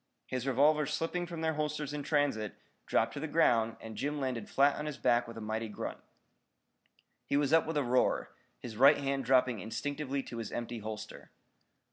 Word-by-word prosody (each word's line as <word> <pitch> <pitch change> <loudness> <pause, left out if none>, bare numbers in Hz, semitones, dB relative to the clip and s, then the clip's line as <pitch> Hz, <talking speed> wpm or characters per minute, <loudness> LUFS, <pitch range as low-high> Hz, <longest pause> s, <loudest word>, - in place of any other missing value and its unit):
His 130 +1 -3
revolvers 150 +3 +3
slipping 175 +2 -2
from 170 -2 -6
their 160 0 +1
holsters 150 -1 -2
in 150 - -3
transit, 140 -8 0 0.3
dropped - - +2
to - - -5
the 160 - -3
ground 115 -8 +3
and 110 -1 -8
Jim 145 +4 -2
landed 125 -5 -3
flat 140 +1 +4
on 150 - -4
his 150 - -4
back 120 0 +2
with 115 - -9
a - - -6
mighty 110 +1 -2
grunt. 105 - -5 1.2
He 140 - 0
was 145 +1 +1
up 165 -1 +5
with 160 -1 -1
a 145 - +2
roar, 125 0 +1 0.3
his 115 -3 -8
right 140 +4 +7
hand 135 -2 -1
dropping 125 -2 +3
instinctively 140 +6 -3
to 120 - -8
his 115 - -5
empty 120 0 -4
holster. 110 0 -7
135 Hz, 190 wpm, -32 LUFS, 115-150 Hz, 1.2 s, right